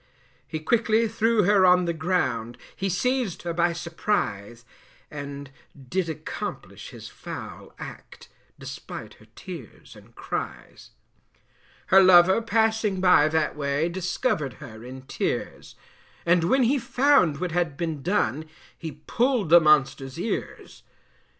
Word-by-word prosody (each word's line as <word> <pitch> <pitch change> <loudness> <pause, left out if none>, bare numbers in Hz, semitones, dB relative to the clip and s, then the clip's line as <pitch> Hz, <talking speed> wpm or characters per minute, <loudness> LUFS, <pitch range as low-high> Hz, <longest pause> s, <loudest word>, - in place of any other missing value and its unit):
He 160 - -4
quickly 225 +6 +2
threw 225 0 +2
her 200 +1 +4
on 180 -1 +5
the 170 - -1
ground, 160 -9 -1 0.2
He 195 - -2
seized 250 +1 -1
her 170 -1 -3
by 170 +1 +2
surprise, 125 - -3 0.5
And 140 -1 -7 0.4
did 185 -2 -1
accomplish 160 - -6
his - - -10
foul - - -9
act, - - -11 0.3
Despite - - -8
her - - -19
tears - - -10
and - - -18
cries. - - -6 1.0
Her 195 - +9
lover 185 +2 +6
passing 220 -3 +1
by 180 -5 +5
that 155 0 0
way, 145 +2 -1
Discovered 175 - -2
her 110 0 -11
in 130 +1 -9
tears, 130 - -4 0.5
And 170 0 +3
when 260 +9 +3
he 270 +4 +2
found 245 - +3
what 180 -2 -2
had 170 -4 -1
been 160 -4 -3
done 160 -3 0 0.3
He 155 -2 -9
pulled 245 - +1
the 170 +1 +9
monster's 140 -2 +2
ears. 220 - -5
175 Hz, 130 wpm, -25 LUFS, 150-210 Hz, 1.0 s, Her